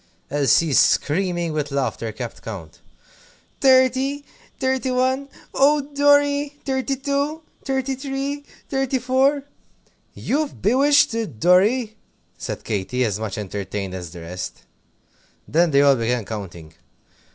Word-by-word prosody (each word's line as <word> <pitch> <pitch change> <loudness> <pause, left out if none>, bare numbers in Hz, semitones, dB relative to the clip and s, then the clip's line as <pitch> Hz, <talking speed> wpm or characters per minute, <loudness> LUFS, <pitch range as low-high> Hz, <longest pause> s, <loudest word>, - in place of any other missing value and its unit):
Elsie, 145 +2 +3
screaming 175 +3 +2
with 150 -1 -2
laughter, 125 -5 -2
kept 115 +2 -7
count. 90 -9 -9 0.8
"Thirty, 265 +2 +3 0.3
Thirty 260 0 0
one 260 +2 0 0.2
Oh, 290 +2 +4
Dorry! 285 0 +3
Thirty 270 0 -1
two! 280 +4 -2 0.2
Thirty 265 -1 -1
three! 275 +1 -4 0.2
Thirty 270 -1 0
four!" 265 +3 +2 0.7
"You've 295 +1 -2
bewitched 280 +6 +4
it, 215 - -4
Dorry!" 210 - +3 0.4
said - - -6
Katy, 115 +5 -1
as 105 -2 -2
much 110 -3 -4
entertained 100 -1 -4
as 90 -2 -6
the 85 +1 -10
rest. 90 +3 -7 0.8
Then 170 +3 +3
they 140 -1 +4
all 140 -1 +6
began 115 -1 -1
counting. 85 -7 -8
225 Hz, 120 wpm, -22 LUFS, -, 0.8 s, all